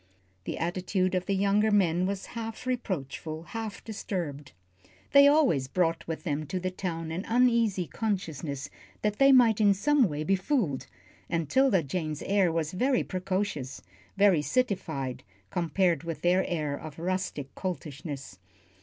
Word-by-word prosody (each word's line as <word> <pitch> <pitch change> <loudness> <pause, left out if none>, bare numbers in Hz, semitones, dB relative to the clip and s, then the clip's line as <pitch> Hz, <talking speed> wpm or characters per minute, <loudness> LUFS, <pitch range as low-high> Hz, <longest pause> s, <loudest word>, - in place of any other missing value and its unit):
The - - -3
attitude 185 +2 -1
of 185 0 -1
the 200 - +1
younger 200 +2 +3
men 185 -3 +3
was 195 -1 -3
half 225 0 -6
reproachful, 165 - -3
half 220 +3 -6
disturbed. 175 -10 -5 0.6
They 280 0 +8
always 275 - +4
brought 165 +3 0
with 160 -1 -4
them 155 -3 -2
to 185 - -2
the 185 +1 -2
town 165 -3 -4
an 175 +4 -3
uneasy 230 -6 +3
consciousness 165 -10 -3 0.3
that 210 -1 0
they 275 0 +7
might 235 -5 +5
in 200 -2 +5
some 265 +1 +3
way 150 0 -3
be 195 +5 +2
fooled, 190 - -1 0.4
and 165 -2 -1
'Tilda 240 - +3
Jane's 155 +1 -3
air 195 -3 +2
was 160 -1 -1
very 250 +7 +1
precocious, 185 -7 -3 0.3
very 195 -6 +5
citified, 160 - -1 0.3
compared 175 -1 +1
with 165 -1 -5
their 180 +2 +4
air 150 -4 -1
of 155 0 -9
rustic 170 -5 -3
coltishness. 145 - -6
185 Hz, 145 wpm, -28 LUFS, 160-210 Hz, 0.6 s, They